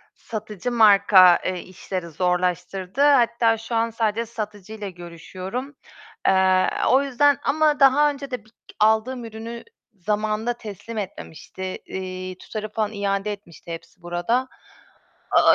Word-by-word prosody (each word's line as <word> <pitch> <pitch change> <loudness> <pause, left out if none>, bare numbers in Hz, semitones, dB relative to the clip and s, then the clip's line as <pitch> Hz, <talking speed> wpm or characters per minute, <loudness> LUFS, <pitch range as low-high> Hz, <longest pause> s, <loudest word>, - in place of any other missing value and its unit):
Satıcı 215 0 -5
marka, 200 -5 +7
eee, 185 -1 -1
işleri 185 -1 -6
zorlaştırdı. 180 - -1
Hatta 235 -5 +4
şu 225 +1 -5
an 230 0 +2
sadece 225 0 -1
satıcıyla 210 -2 -6
görüşüyorum. 185 - -7 0.5
Eee, 190 -1 +4 0.2
o 265 +2 +5
yüzden, 280 +1 +3
ama 305 0 +2
daha 280 +2 +6
önce 280 -1 -6
de 230 -4 -5
bir 220 - -23 0.3
aldığım 220 +3 +2
ürünü 225 +1 -7 0.3
zamanında 215 +4 -1
teslim 220 0 -9
etmemişti. 190 -3 -7 0.2
Eee, 185 -1 -6
tutarı 215 -1 -6
falan 215 0 -2
iade 200 0 -1
etmişti 175 -4 -10
Hepsiburada. 175 +9 -2 0.8
Aaa, - - +6
215 Hz, 120 wpm, -23 LUFS, 185-235 Hz, 0.8 s, marka